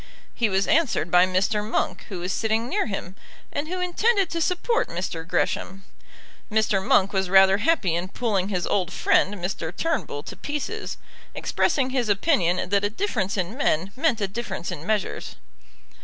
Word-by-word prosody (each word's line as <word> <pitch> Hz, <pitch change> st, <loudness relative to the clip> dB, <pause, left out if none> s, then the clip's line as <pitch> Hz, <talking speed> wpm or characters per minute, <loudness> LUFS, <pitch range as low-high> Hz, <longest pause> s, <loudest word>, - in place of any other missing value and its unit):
He 230 Hz, -3 st, +1 dB
was 190 Hz, 0 st, +1 dB
answered 260 Hz, -, +2 dB
by 180 Hz, +1 st, +6 dB
Mr. 195 Hz, +3 st, +1 dB
Monk, 215 Hz, -, -2 dB
who 185 Hz, -4 st, -5 dB
was 180 Hz, +2 st, -2 dB
sitting 225 Hz, +1 st, 0 dB
near 250 Hz, -, 0 dB
him, 195 Hz, -3 st, -5 dB, 0.4 s
and 290 Hz, +2 st, -2 dB
who 365 Hz, +2 st, -3 dB
intended 390 Hz, +2 st, +1 dB
to 335 Hz, -, -2 dB
support 365 Hz, +8 st, +1 dB
Mr. 170 Hz, -1 st, -4 dB
Gresham. 190 Hz, +1 st, -1 dB, 0.7 s
Mr. 210 Hz, -3 st, +2 dB
Monk 195 Hz, +1 st, +3 dB
was 190 Hz, -2 st, 0 dB
rather 195 Hz, +1 st, +6 dB
happy 220 Hz, -, +2 dB
in 175 Hz, +2 st, -1 dB
pulling 200 Hz, -2 st, -1 dB
his 180 Hz, -4 st, -1 dB
old 185 Hz, -3 st, 0 dB
friend, 195 Hz, +2 st, +2 dB
Mr. 175 Hz, -3 st, -4 dB
Turnbull, 285 Hz, -, -2 dB
to -, -, -8 dB
pieces, 345 Hz, +9 st, -4 dB, 0.4 s
expressing 270 Hz, -6 st, 0 dB
his 250 Hz, -4 st, 0 dB
opinion 190 Hz, -, +2 dB
that 200 Hz, 0 st, +3 dB
a 205 Hz, -, +2 dB
difference 215 Hz, -, -2 dB
in 185 Hz, +4 st, -2 dB
men 190 Hz, -, 0 dB
meant 270 Hz, -4 st, +1 dB
a 200 Hz, -, 0 dB
difference 195 Hz, -4 st, -5 dB
in 155 Hz, +4 st, -7 dB
measures. 215 Hz, -2 st, -2 dB
205 Hz, 170 wpm, -24 LUFS, 185-265 Hz, 0.7 s, by